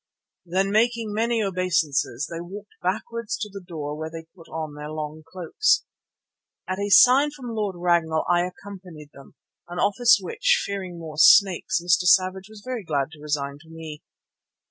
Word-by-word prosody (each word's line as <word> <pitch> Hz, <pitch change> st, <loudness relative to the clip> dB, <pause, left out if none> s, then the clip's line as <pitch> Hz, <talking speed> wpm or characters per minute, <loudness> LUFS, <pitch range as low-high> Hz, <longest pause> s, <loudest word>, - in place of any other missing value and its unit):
Then 190 Hz, +3 st, 0 dB
making 225 Hz, 0 st, +1 dB
many 230 Hz, +1 st, 0 dB
obeisances 165 Hz, -, 0 dB
they 165 Hz, 0 st, -6 dB
walked 200 Hz, +4 st, -10 dB
backwards 220 Hz, +4 st, -3 dB
to 210 Hz, -, -5 dB
the 200 Hz, -2 st, -8 dB
door 150 Hz, -4 st, -6 dB
where 155 Hz, +1 st, -5 dB
they 165 Hz, 0 st, -8 dB
put 165 Hz, -3 st, -16 dB
on 155 Hz, -2 st, -5 dB
their 150 Hz, 0 st, -8 dB
long 155 Hz, 0 st, -6 dB
cloaks. 185 Hz, -, +1 dB, 0.8 s
At 185 Hz, +1 st, -3 dB
a 205 Hz, 0 st, -2 dB
sign 260 Hz, +7 st, +7 dB
from 260 Hz, -5 st, -8 dB
Lord 210 Hz, -4 st, -2 dB
Ragnall 170 Hz, -2 st, +1 dB
I 175 Hz, 0 st, +2 dB
accompanied 180 Hz, -6 st, -12 dB
them, 140 Hz, -, -16 dB, 0.3 s
an 175 Hz, +1 st, -8 dB
office 220 Hz, +5 st, +4 dB
which, 485 Hz, -, +1 dB
fearing 190 Hz, -3 st, -5 dB
more 160 Hz, -2 st, -9 dB
snakes, 190 Hz, +2 st, +5 dB
Mr. 180 Hz, +1 st, +2 dB
Savage 190 Hz, +2 st, +2 dB
was 215 Hz, -2 st, -13 dB
very 250 Hz, -4 st, -4 dB
glad 145 Hz, -3 st, -2 dB
to 155 Hz, -2 st, -14 dB
resign 145 Hz, -2 st, -3 dB
to 160 Hz, +1 st, -19 dB
me. 160 Hz, -2 st, -9 dB
180 Hz, 165 wpm, -24 LUFS, 160-205 Hz, 0.8 s, sign